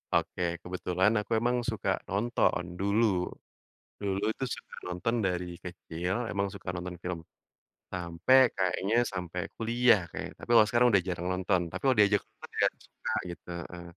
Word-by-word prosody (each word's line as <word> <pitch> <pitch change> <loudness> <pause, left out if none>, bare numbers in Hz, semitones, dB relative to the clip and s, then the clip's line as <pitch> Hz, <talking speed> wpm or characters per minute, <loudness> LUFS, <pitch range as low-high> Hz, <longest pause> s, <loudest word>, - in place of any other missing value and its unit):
Oke, 90 - +1 0.2
kebetulan 90 +2 +1
aku - - -26
emang 120 +1 +1
suka 110 -5 -2 0.2
nonton 100 -2 +1 0.2
dulu, 100 +4 +3 1.0
dulu 100 0 -1 0.2
tuh - - -2
suka - - -12
nonton 90 +7 -1
dari 90 -1 0 0.2
kecil 90 0 -4 0.2
emang 100 0 0
suka 95 -2 -7
nonton 90 0 -5
film, 90 -1 -3 0.7
sampai 90 +7 +3 0.2
kayaknya 95 +3 +1 0.2
sampai 90 -1 -4 0.2
kuliah 120 -1 +4
kayaknya - - -6
tapi - - -9
kalau 110 - +9
sekarang 120 +2 +4
udah 100 -2 +5
jarang 90 -1 -2
nonton 90 0 +1
tapi 95 +3 -6
kalo 135 - +5
diajak 100 0 +5
nonton - - -14
ya - - +7 0.2
suka - - -6 0.2
gitu 85 - -10 0.2
heeh, 85 0 -8
95 Hz, 155 wpm, -30 LUFS, 90-110 Hz, 1.0 s, kalau